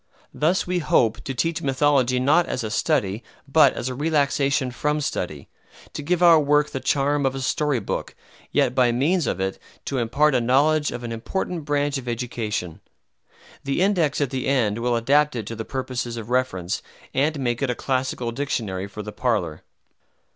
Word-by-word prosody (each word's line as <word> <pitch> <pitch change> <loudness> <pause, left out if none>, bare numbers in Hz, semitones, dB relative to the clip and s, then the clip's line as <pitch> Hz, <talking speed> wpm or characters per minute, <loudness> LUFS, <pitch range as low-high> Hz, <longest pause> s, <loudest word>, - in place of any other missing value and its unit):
Thus 170 +5 +1
we 180 0 0
hope 120 -8 +2
to 135 - -4
teach 165 +6 -1
mythology 135 -2 +2
not 150 +7 +3
as 125 - -3
a 110 - -4
study, 110 - 0 0.2
but 155 +3 +5
as 125 - -4
a 130 - -2
relaxation 140 -2 +1
from 150 +4 -1
study; 145 - -3 0.5
to - - -5
give 175 +4 0
our 170 -2 +8
work 150 0 +2
the 135 - -3
charm 140 +2 +1
of 135 0 0
a - - -3
story 145 0 0
book, 100 - -4 0.4
yet 125 - +2
by 125 -2 +3
means 145 +5 +1
of - - -1
it 95 0 -2 0.3
to 135 - -2
impart 140 +6 +2
a 125 - +2
knowledge 145 +5 +3
of 120 - -6
an 120 - -5
important 160 +7 -3
branch 145 -1 0
of 125 - -11
education. 115 -7 -3 0.8
The 140 +2 -1
index 180 -7 +2
at 145 -4 0
the 130 -1 -2
end 115 -6 +1
will 120 0 +1
adapt 145 +5 +2
it 115 -3 -3
to 115 - -6
the 110 0 -5
purposes 125 -3 -4
of 115 +1 -7
reference, 105 -7 -1 0.3
and 145 +2 +1
make 120 -2 -1
it 135 - 0
a 125 - 0
Classical 130 -2 -2
Dictionary 110 -8 -3
for 105 +1 -8
the 105 - -7
parlor. 90 -11 -1
130 Hz, 185 wpm, -23 LUFS, 120-145 Hz, 0.8 s, our